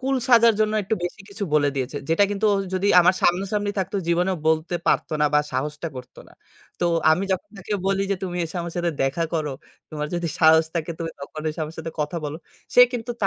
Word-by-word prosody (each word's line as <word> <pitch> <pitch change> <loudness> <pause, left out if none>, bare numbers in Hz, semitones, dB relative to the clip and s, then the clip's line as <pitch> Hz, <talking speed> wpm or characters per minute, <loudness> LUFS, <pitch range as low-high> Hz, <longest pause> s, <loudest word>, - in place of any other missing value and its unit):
কুল 265 +1 0
সাজার 235 -2 +7
জন্য, 215 0 +2
একটু 195 +3 -1
বেশি 180 +4 -5
কিছু 200 +1 -4
বলে 145 -1 +4
দিয়েছে। 135 +1 -3
যেটা 165 +5 +4
কিন্তু 205 +1 0 0.3
যদি 190 +1 0
আমার 180 +2 +4
সামনাসামনি 195 +3 +1
থাকতো 190 +2 -2
জীবনেও 180 +2 +1
বলতে 160 +2 +1
পারতো - - +1
না 150 - +4
বা - - +6
সাহসটা 150 +5 -3
করতো 125 0 -10
না। - - -20 0.5
তো - - 0 0.3
আমি 170 +5 +2
যখন 285 +11 -3
তাকে 195 +3 -6
বলি 195 0 +1
যে - - +3
তুমি 180 -2 -3
এসে 165 +2 -7
আমার 170 0 -6
সাথে 175 -1 0
দেখা 135 +5 0
করো, 155 -3 -1 0.4
তোমার 150 -1 -3
যদি 175 -1 -2
সাহস 160 0 +6
থাকে 165 0 -2
তখন 155 -2 -7
এসে 155 - -5
আমার 155 +1 -9
সাথে 160 0 -5
কথা 150 +3 -2
বলো। 150 +1 -4 0.4
সে - - +8
কিন্তু 240 0 -4
তা - - +5
170 Hz, 215 wpm, -23 LUFS, 155-195 Hz, 0.5 s, সে